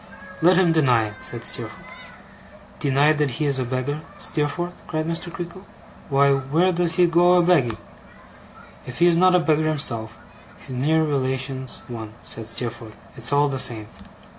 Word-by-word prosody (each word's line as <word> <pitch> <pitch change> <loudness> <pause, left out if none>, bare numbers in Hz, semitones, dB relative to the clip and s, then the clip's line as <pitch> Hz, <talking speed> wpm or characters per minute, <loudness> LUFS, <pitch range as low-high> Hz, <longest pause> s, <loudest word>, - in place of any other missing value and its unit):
'Let 180 +2 +5
him 180 -3 +4
deny 125 -9 +2
it,' 105 0 -13
said - - 0
Steerforth. - - 0 0.9
'Deny 140 +2 +3
that 150 -2 0
he 155 - -1
is 140 -2 +2
a - - 0
beggar, 130 +4 -3 0.2
Steerforth?' 175 +1 -3
cried 155 0 -2
Mr. 165 +1 -3
Creakle. 175 +2 -8 0.5
'Why, 140 0 +3
where 140 +7 +1
does 175 -1 0
he 180 - +4
go 175 +1 +4
a 180 -1 +4
begging?' 135 -11 +2 1.1
'If 125 - -8
he 175 - +3
is 175 -1 +5
not 185 +1 +4
a - - +5
beggar 155 -2 +1
himself, 115 -8 0 0.4
his 130 - -10
near 155 +6 +1
relation's 130 -2 -3
one,' 110 -3 -8
said 115 -1 -3
Steerforth. 115 -1 -4 0.2
'It's 120 -1 -3
all 145 +1 +3
the 135 -2 -3
same. 110 -4 0
145 Hz, 165 wpm, -22 LUFS, 125-170 Hz, 1.1 s, Let